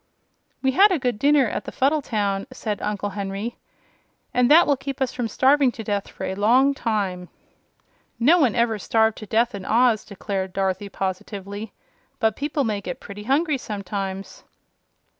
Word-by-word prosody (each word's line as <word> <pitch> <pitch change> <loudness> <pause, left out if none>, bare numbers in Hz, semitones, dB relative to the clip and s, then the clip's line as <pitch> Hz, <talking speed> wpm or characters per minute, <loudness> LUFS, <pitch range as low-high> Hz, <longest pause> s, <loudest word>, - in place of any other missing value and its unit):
"We 265 - +3
had 395 +9 +6
a 365 - +2
good 245 -6 -2
dinner 285 -1 +4
at - - -4
the - - -6
Fuddle 290 +3 +1
town," 205 -4 -1
said 220 -5 -4
Uncle 205 -1 -2
Henry, 200 +3 -4 0.8
"and 250 0 +3
that 325 +4 +7
will 285 - +3
keep 270 0 -6
us 265 -2 -1
from 245 -2 -2
starving 265 +4 +3
to 225 - -7
death 205 -1 -2
for - - -9
a 190 - -2
long 245 +8 +4
time." 195 -8 -2 0.9
"No 310 +9 +5
one 255 -9 +3
ever 235 -2 +1
starved 220 +1 +1
to 215 - -9
death 230 +3 +1
in 200 -2 -6
Oz," 230 +1 +3
declared 195 -2 -4
Dorothy, 190 +1 -1
positively; 200 +2 -5 0.5
"but 220 -3 +2
people 290 0 -1
may 210 -4 -1
get 180 -3 -6
pretty 205 +1 -9
hungry 285 +2 +1
sometimes." 195 -2 -5
220 Hz, 170 wpm, -23 LUFS, 200-265 Hz, 0.9 s, that